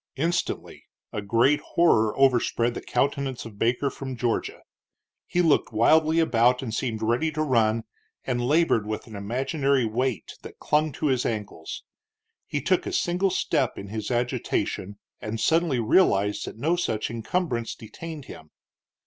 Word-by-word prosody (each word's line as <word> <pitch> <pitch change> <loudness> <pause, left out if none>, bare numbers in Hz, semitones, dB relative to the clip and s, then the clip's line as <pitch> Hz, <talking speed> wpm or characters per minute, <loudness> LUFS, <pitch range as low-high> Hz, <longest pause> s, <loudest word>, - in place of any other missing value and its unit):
Instantly 170 +5 -2 0.3
a 105 - -2
great 115 +8 +3
horror 110 -11 +2
overspread 120 -3 +3
the - - -6
countenance 140 -2 -1
of 105 -3 -11
Baker 125 +4 +1
from 130 -1 -6
Georgia. 120 -1 -2 0.6
He 175 - +1
looked 160 -3 +3
wildly 155 +8 +4
about 125 -5 +3
and 115 -4 -4
seemed 110 -2 -2
ready 120 +8 +1
to 155 +1 0
run, 115 -5 +2 0.4
and 120 -2 -1
labored 140 -6 +2
with 110 0 -4
an 110 -3 -11
imaginary 135 +5 0
weight 120 +1 -2
that - - -11
clung 155 +1 +1
to 155 - -4
his 130 -4 +2
ankles. 105 -3 -4 0.6
He - - -2
took - - +1
a - - -2
single 190 - +1
step 140 -8 0
in 100 - -7
his 110 0 -4
agitation, 120 -5 -2 0.2
and 110 +1 -4
suddenly 160 -4 +2
realized 105 - +3
that - - -8
no 160 +9 +1
such 115 -11 -2
encumbrance 120 +1 -2
detained 155 +6 -9
him. 80 -9 -11
125 Hz, 150 wpm, -25 LUFS, 110-155 Hz, 0.6 s, wildly